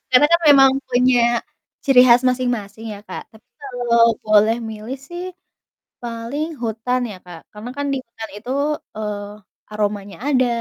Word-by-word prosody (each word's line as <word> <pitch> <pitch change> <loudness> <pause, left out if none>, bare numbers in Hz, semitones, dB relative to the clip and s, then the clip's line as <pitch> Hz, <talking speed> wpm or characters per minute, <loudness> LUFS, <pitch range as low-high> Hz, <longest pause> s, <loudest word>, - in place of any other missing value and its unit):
Karena 255 +3 +6
kan 340 - +5
memang 270 -2 +8 0.2
punya 250 0 +3 0.6
ciri 270 -3 +6
khas 240 +1 +6
masing-masing 235 -4 -2
ya - - -10
Kak, - - -6
tapi 225 +2 -19 0.2
kalau 235 -3 +2
boleh 215 +1 +4
milih 220 +4 -6
sih 345 +6 -8 0.8
paling 235 +6 -4 0.2
hutan 230 +3 -1
ya 195 - -8
Kak, 175 -2 -11
karena 220 +4 -7
kan 285 0 -2
di 270 - 0
hutan 225 -1 -9
itu, 230 +4 -8 0.5
eee, 210 -1 -4 0.5
aromanya 205 -1 -3
ada 255 -3 +3
235 Hz, 145 wpm, -20 LUFS, 215-255 Hz, 0.8 s, memang